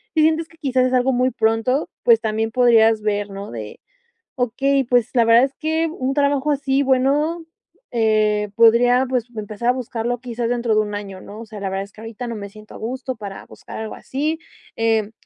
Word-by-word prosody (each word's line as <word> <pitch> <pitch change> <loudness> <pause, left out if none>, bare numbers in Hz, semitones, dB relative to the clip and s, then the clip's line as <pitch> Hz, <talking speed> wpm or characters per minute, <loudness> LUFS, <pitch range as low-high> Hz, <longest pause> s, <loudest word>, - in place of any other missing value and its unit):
si 315 - +4
sientes 320 +1 +2
que 325 - -22
quizás 260 -4 +1
es 255 - -3
algo 255 +1 +3
muy 250 +1 +2
pronto, 225 +5 +1 0.2
pues 470 -2 +5
también 220 +1 -1
podrías 225 -2 +4
ver, 205 -1 -1
¿no? 195 +1 -7
De 110 -3 -8 0.6
okey, 270 +3 +1
pues 245 -1 +2
la 235 -3 +4
verdad 230 +2 +6
es 270 - 0
que 320 +1 0
un 270 -4 -2
trabajo 285 0 +1
así, 275 -1 +1
bueno, 285 +6 +1 0.5
eh, 215 -2 +2
podría 245 +3 +5
pues 250 -3 0
empezar 215 +3 -3
a - - +7
buscarlo 245 -1 -3
quizás 240 -1 -3
dentro 235 -2 0
de 215 - +4
un 210 -1 -4
año, 195 -2 -7
¿no? 210 +2 -10
O - - -8
sea, 215 -1 -9
la 195 - -2
verdad 195 +1 -2
es 200 - -13
que 215 - -13
ahorita 225 +2 -7
no 235 - -4
me 200 -1 -7
siento 215 +1 -14
a - - -9
gusto 255 +3 -4
para 200 -3 -8
buscar - - -11
algo 220 0 -5
así, 305 +4 -2 0.4
em, 225 -2 +1
240 Hz, 210 wpm, -21 LUFS, 215-265 Hz, 0.6 s, a